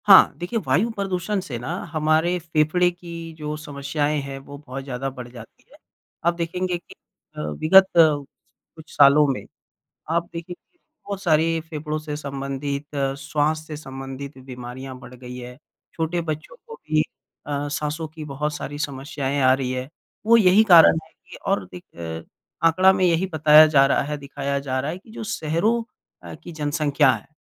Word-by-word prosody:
हाँ, 195 -2 +8
देखिए, 180 +7 -2
वायु 155 - +2
प्रदूषण 195 -1 -2
से 140 -10 -5
ना 120 - -7 0.2
हमारे 160 +3 +2
फेफड़े 160 +2 +2
की 170 -2 -9
जो 150 -1 -4
समस्याएँ 145 0 -2
हैं, 135 0 -6
वो 140 +1 -11
बहुत 135 +2 -6
ज़्यादा 135 0 -4
बढ़ 125 -2 -9
जाती 115 -3 -13
हैं। - - -17 0.5
आप 170 - +4
देखेंगे 175 +1 -2
कि 175 - -16 0.4
अ, - - -3
विगत 155 - +5
कुछ 155 0 0
सालों 145 +1 +7
में, 135 - -2 0.7
आप 170 +1 0
देखेंगे 175 - -9 0.3
बहुत 200 -1 -4
सारे 165 -1 +2
फेफड़ों 155 0 -3
से 150 -1 -5
संबंधित, 140 0 -4 0.3
श्वास 155 +2 -1
से 155 - -6
संबंधित 135 -1 -8
बीमारियाँ 130 0 -8
बढ़ 125 0 -12
गई 125 0 -9
हैं, 125 +1 -9 0.4
छोटे 165 +1 -1
बच्चों 155 - -5
को 460 - -9
भी 155 - 0 0.4
अ, 145 0 -2
साँसों 150 +2 -3
की 155 0 -9
बहुत 150 +1 -3
सारी 145 0 -6
समस्याएँ 140 -1 -3
आ 130 0 +6
रही 130 -1 -2
हैं। 130 +1 -4 0.4
वो 230 +1 +7
यही 205 -1 +6
कारण 170 -5 +8
है - - -23
कि 180 - -15
और 195 +1 0
एक 85 - -8 0.4
आँकड़ा 185 +4 +6
में 190 -1 +1
यही 175 +1 +2
बताया 155 0 +7
जा 145 -3 +5
रहा 140 - +2
है, 150 +2 -3
दिखाया 140 0 -3
जा 135 -2 -2
रहा 140 +3 -2
है 175 - -5
कि 210 - -19
जो 220 - -7
शहरों 205 +7 0 0.4
अ, - - -9
की 175 - -11
जनसंख्या 145 -2 +2
है, - - -6
150 Hz, 170 wpm, -23 LUFS, 140-170 Hz, 0.7 s, हाँ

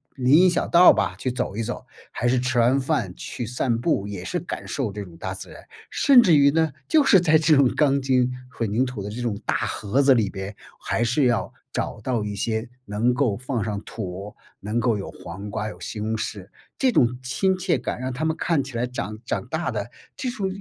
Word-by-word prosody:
林 130 +1 +4
荫 185 - +6
小 175 - 0
道 175 +1 +7
吧， - - -1
去 130 - -2
走 120 -5 -3
一 115 - -1
走， 120 +2 -5 0.3
还 120 - -1
是 125 +1 +3
吃 125 0 0
完 125 +4 +4
饭 130 - -1
去 120 - -6
散 120 0 -1
步， 100 -4 0
也 100 -3 -6
是 - - -2
感 - - -6
受 - - -2
这 105 +1 -6
种 85 -4 -13
大 95 +2 -4
自 95 - -9
然。 - - -12 0.3
甚 270 -3 +6
至 175 -8 +5
于 140 -1 +6
呢， 160 0 +2 0.2
就 315 -2 +4
是 200 -8 +6
在 160 -2 +4
这 160 0 +4
种 140 -2 +5
钢 140 -2 +3
筋 130 -1 +2 0.2
混 115 -5 -3
凝 120 +5 +2
土 125 -5 -5
的 100 - -5
这 115 +4 -6
种 115 -4 -1
大 - - +1
盒 110 +7 0
子 135 0 +6
里 110 -5 +2
边 95 +1 -6 0.2
还 120 - -1
是 125 +4 +2
要 120 -3 +1 0.2
找 - - -3
到 115 0 -1
一 105 -1 -4
些 110 +3 -2 0.2
能 105 +4 +1
够 125 -7 +1
放 125 -1 -3
上 105 -2 -3
土， 100 -1 -7 0.2
能 105 +3 -2
够 115 -3 +1
有 95 - -6
黄 95 +4 -8
瓜 105 +1 -3
有 110 - -8
西 110 - -6
红 110 +1 -1
柿， 105 -3 -5 0.3
这 260 -2 +3
种 125 - +3
亲 190 +9 +1
切 180 -6 0
感 - - -4
让 130 0 -3
它 135 +5 -4
们 160 0 0
看 160 -5 +1
起 130 -2 -7
来 120 - 0
长 110 -4 -5
长 125 - -3
大 160 +4 -2
的， 105 -1 -4 0.3
这 260 - -3
种 215 -6 -2
120 Hz, 250 characters per minute, -24 LUFS, 105-140 Hz, 0.3 s, 道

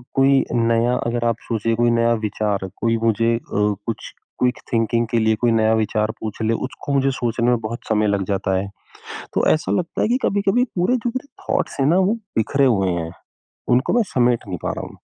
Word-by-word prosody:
कोई 135 0 +4
नया 115 +1 +2
अगर 120 0 -1
आप 115 - +1
सोचिए 115 0 0
कोई 120 +1 +2
नया 115 0 +3
विचार 100 -2 -1
कोई 115 0 +2
मुझे 115 +1 +2
अ, - - -2 0.5
कुछ 115 - -5 0.3
क्विक 125 0 +1 0.2
थिंकिंग 115 0 +1
के 115 - +2
लिए 110 0 +2
कोई 120 -1 +3
नया 110 0 +3
विचार 110 0 0
पूछ 110 0 -6
ले, 110 +1 +1
उसको 135 +3 -4
मुझे 135 0 +2
सोचने 120 -1 -1
में 120 -1 +3
बहुत 115 +2 -4
समय 105 -1 +2
लग 100 -1 +1
जाता 95 -1 0
है। 100 +1 -2 0.7
तो - - +1
ऐसा 155 - -2
लगता 175 -2 -1
है - - +2
कि 250 - +3
कभी-कभी 200 +4 +2
पूरे 180 +8 +2
जो 240 +1 -2
मेरे 270 +2 -4 0.2
थॉट्स - - -2
हैं 135 - +3
ना 170 +4 +4
वो 190 +3 +3 0.2
बिखरे 140 +5 +2
हुए 95 -7 +2
हैं, 85 -1 -3 0.6
उनको 125 +3 +2
मैं 240 -2 +4
समेट 120 -1 +3
नहीं 90 -2 -4
पा - - -1
रहा - - -5
हूँ। - - -15
115 Hz, 210 wpm, -21 LUFS, 110-135 Hz, 0.7 s, कोई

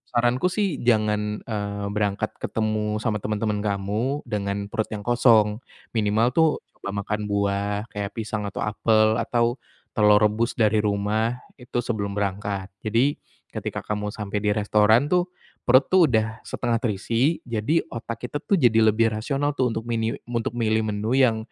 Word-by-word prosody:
saranku 120 +7 +2
sih 195 -6 -1
jangan, 105 -2 +1
eee, 100 -2 -4
berangkat 105 +1 -1
ketemu 110 -1 -1
sama 110 -2 0
teman-teman 105 0 -1
kamu, 105 +8 -1
dengan 100 -3 -3
perut 110 - -1
yang 105 - -5
kosong. 115 -3 +4 0.4
Minimal 110 +1 +2
tuh, 160 -1 +5 0.3
coba - - -6
makan 105 +1 -2
buah, 100 +1 0
kayak 105 -2 -4
pisang 110 -1 -3
atau - - -6
apel 110 0 +3
atau, 120 +1 0 0.4
telur 105 -2 +5
rebus 110 +3 +1
dari 110 -2 +3
rumah, 105 +3 0 0.2
itu 125 0 -3
sebelum 105 -4 -2
berangkat. 100 -1 -2 0.2
Jadi, 120 +7 +2 0.3
ketika - - -4
kamu 105 0 -3
sampai 105 -1 -3
di 105 - +2
restoran 105 +5 +3
tuh, 180 0 +3 0.4
perut 130 +2 +5
tuh 185 -3 +6
udah 110 -1 0
setengah 120 -1 -1
terisi, 115 - 0
jadi 120 +8 0
otak 115 +1 -6
kita 145 - -3
tuh 200 - +2
jadi 115 -5 +4
lebih 115 +1 +3
rasional 140 +7 -1
tuh, 130 -1 +2
untuk 110 - -3
miniu 115 -1 0 0.2
untuk 115 -1 -2
milih 110 -1 +1
menu 105 +2 -2
yang, 120 -4 +4
110 Hz, 155 wpm, -24 LUFS, 105-120 Hz, 0.4 s, tuh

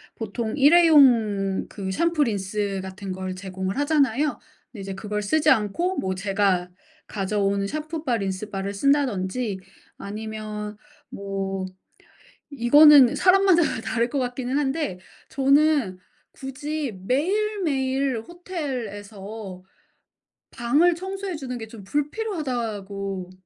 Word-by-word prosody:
보통 220 0 -4
일회용 265 - +5
그 190 -2 -5
샴푸, 335 - +1
린스같은 195 -3 -3
걸 185 0 -5
제공을 190 +1 -5
하잖아요. 290 -1 +1 0.3
근데 215 - -9
이제 195 0 -5
그걸 210 +1 -4
쓰지 305 +8 +2
않고 265 - +1
뭐 190 0 -1
제가 195 -2 0 0.4
가져온 200 -1 -1
샴푸바, 310 -1 -3
린스바를 195 0 -4
쓴다든지. 225 -4 0 0.4
아니면 215 0 -6 0.3
뭐 195 -1 -4 0.9
이거는 280 0 +7
사람마다 375 -2 +5 0.2
다를 235 0 0
것 280 - -3
같기는 250 +1 -2
한데 290 - -1 0.3
저는 275 -7 +2 0.3
굳이 280 0 -4
매일매일 280 - 0
호텔에서 220 - -7 0.9
방을 295 +9 +2
청소해 385 0 -5
주는 255 -4 -5
게 225 - -7
좀 220 -3 -11
불필요하다고 225 - -3
235 Hz, 240 characters per minute, -24 LUFS, 200-295 Hz, 0.9 s, 이거는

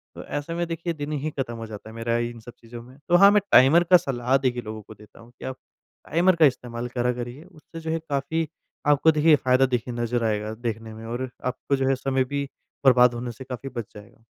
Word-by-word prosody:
तो - - -8
ऐसे 145 +3 -4
में 175 +1 -1
देखिए 165 0 -3
दिन 150 0 -5
ही 150 +1 -2
खत्म 125 -3 -2
हो 115 - -6
जाता 110 0 -9
है 110 - -12
मेरा 115 0 -1
इन 120 0 -3
सब 115 +2 -11
चीज़ों 115 0 -10
में। 130 +3 -16
तो 175 - +5
हाँ, 200 +2 +8
मैं 210 - +4
टाइमर 150 +7 +7
का 180 +1 +6
सलाह 130 -3 -1
देखिए 125 -2 -1
लोगों 110 -1 -7
को 110 - -13
देता 105 +2 -18
हूँ 115 +1 -16
कि - - -8
आप 130 - -5 0.5
टाइमर 175 +3 +3
का 160 -2 +6
इस्तेमाल 120 -2 -1
करा 125 +1 +2
करिए। 125 +5 -7
उससे 165 -2 -13
जो 160 0 -4
है 165 - 0
काफ़ी 150 +3 -1 0.4
आपको 150 +2 +5
देखिए 155 0 +5
फायदा 130 +1 +4
देखिए 125 -1 -2
नज़र 120 0 -1
आएगा 105 0 -1
देखने 110 0 -5
में 110 +1 -10
और 120 +2 -4 0.2
आपको 130 +2 -1
जो 135 -1 0
है 135 - +3
समय 130 0 0
भी 140 -1 -1 0.4
बर्बाद 125 -1 +6
होने 120 0 -4
से 125 +3 -10
काफ़ी 130 +1 -7
बच 120 -3 -6
जाएगा। 105 +2 -14
130 Hz, 240 wpm, -24 LUFS, 120-150 Hz, 0.5 s, हाँ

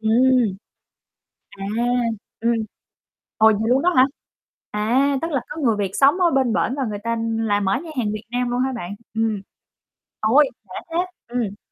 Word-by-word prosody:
Ừm. 235 -1 +3 0.9
À, 195 -1 -8 0.8
ừm, 230 +1 +2 0.8
ồ, 220 - +5
vậy 220 - 0
luôn 260 +3 +3
đó 360 - +4
hả? 255 - +8 0.7
À, 255 +7 +2
tức 330 - -2
là 275 -4 0
có 300 +2 -6
người 230 -7 +2
Việt 200 -2 -1
sống 285 +7 +4
ở 350 -2 +4
bên 265 -5 +2
bển 245 - +1
và 275 - -1
người 210 -3 -3
ta 230 0 0 0.2
là 210 -2 +1
mở 195 -1 +1
nhà 330 - -8
hàng 215 -4 0
Việt 215 0 -6
Nam 245 0 -1
luôn 245 +1 0
hả 265 +1 0
bạn? 200 -6 -5 0.2
Ừm. 220 -3 0 0.8
Ôi, 260 +7 +5 0.2
khỏe 185 - -7
thế! 345 +2 0 0.2
Ừm. 230 -4 -3
235 Hz, 180 wpm, -22 LUFS, 215-265 Hz, 0.9 s, hả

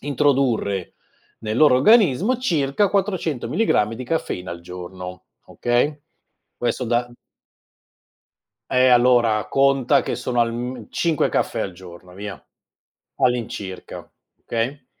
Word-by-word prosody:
introdurre 130 - 0 0.5
nel 110 0 -3
loro 150 -4 +6
organismo 210 - +4
circa 170 - +1
400 185 - -1
milligrammi 115 - +1
di 130 +3 -7
caffeina 120 - -3
al 85 - -7
giorno, 90 +1 -9 0.2
okay, 125 +5 0 0.6
questo 120 +1 -1
da 120 +1 0
m - - -17 1.6
Eh, 130 0 +4
allora 120 -3 +4
conta 135 -2 +3
che - - -3
sono 125 0 -1
alm 120 0 -3
5 165 -4 +1
caffè - - -1
al 95 - -2
giorno 90 0 -13
via, 100 +1 -8 0.7
all'incirca, 110 -6 -3 0.3
okay? 120 +5 -3
125 Hz, 110 wpm, -22 LUFS, 105-145 Hz, 1.6 s, loro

